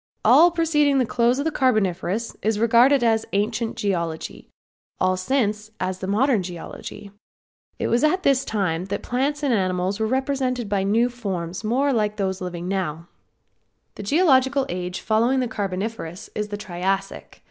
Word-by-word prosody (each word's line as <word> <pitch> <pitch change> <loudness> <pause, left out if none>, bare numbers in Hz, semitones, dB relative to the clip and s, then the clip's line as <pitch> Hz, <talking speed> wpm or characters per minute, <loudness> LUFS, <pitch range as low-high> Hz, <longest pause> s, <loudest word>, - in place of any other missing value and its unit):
All 345 - +7
preceding 305 -4 +2
the 255 - +3
close 240 +2 +2
of 280 - -2
the 320 - +1
Carboniferous 215 - 0
is 220 0 0
regarded 240 +4 +5
as 225 -1 +2
ancient 215 +3 -1
geology; 170 -5 -3 0.5
all 185 0 +2
since 210 0 -1
then 220 - -31
as 185 0 -6
modern 215 +4 +2
geology. 180 +3 -8 0.7
It - - -2
was 235 +4 +1
at 365 +5 +2
this 275 -1 +3
time 185 -5 -1
that 200 +1 -4
plants 280 +4 -1
and 275 -4 +2
animals 185 0 0
were 220 - +1
represented 260 -2 -1
by 200 -1 0
new 220 +5 +2
forms 190 -7 -5
more 265 +6 +1
like 210 -2 0
those 190 -2 -2
now - - -3
living. 175 0 -5 1.2
The - - -8
geological 270 - +3
age 180 +1 -4
following 230 +5 +2
the 250 - 0
Carboniferous 195 -3 -4
is 210 0 -3
the 205 0 -5
Triassic. 195 0 -3
215 Hz, 160 wpm, -23 LUFS, 190-260 Hz, 1.2 s, All